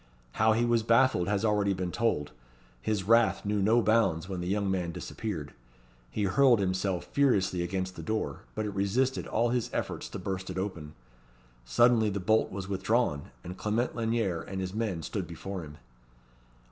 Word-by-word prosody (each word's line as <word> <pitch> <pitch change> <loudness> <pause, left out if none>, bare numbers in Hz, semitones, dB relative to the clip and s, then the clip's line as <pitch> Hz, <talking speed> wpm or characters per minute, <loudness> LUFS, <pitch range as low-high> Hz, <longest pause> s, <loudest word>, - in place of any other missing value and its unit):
How 110 - +3
he 115 +2 +2
was 120 -1 +3
baffled 115 -4 +3
has 105 +1 0
already 105 -2 +2
been 90 -1 -3
told. 110 -11 0 0.5
His 105 - -1
wrath 115 +2 +3
knew 105 0 0
no 110 +4 +4
bounds 110 -7 +2
when 95 -2 -4
the 90 - -4
young 100 0 0
man 90 -3 -1
disappeared. 85 -4 -5 0.6
He 85 +11 -2
hurled 125 +5 +5
himself 95 -1 -1
furiously 100 -10 +2
against 95 +1 -3
the - - -7
door, 110 0 -2 0.2
but 110 - -2
it 105 - -4
resisted 120 +7 0
all 115 +2 +1
his 120 -1 0
efforts - - -3
to - - -6
burst 95 0 -4
it 90 - -5
open. 85 -6 -4 0.7
Suddenly 110 - +4
the 100 0 -2
bolt 110 +4 +2
was 95 -1 -5
withdrawn, 100 -5 0
and 90 +1 -7
Clement 110 +4 0
Lanyere 110 -7 0
and 95 0 -6
his 95 0 -3
men 105 -7 -2
stood - - -4
before 95 -1 -6
him. 75 -2 -10
100 Hz, 175 wpm, -29 LUFS, 95-115 Hz, 0.7 s, hurled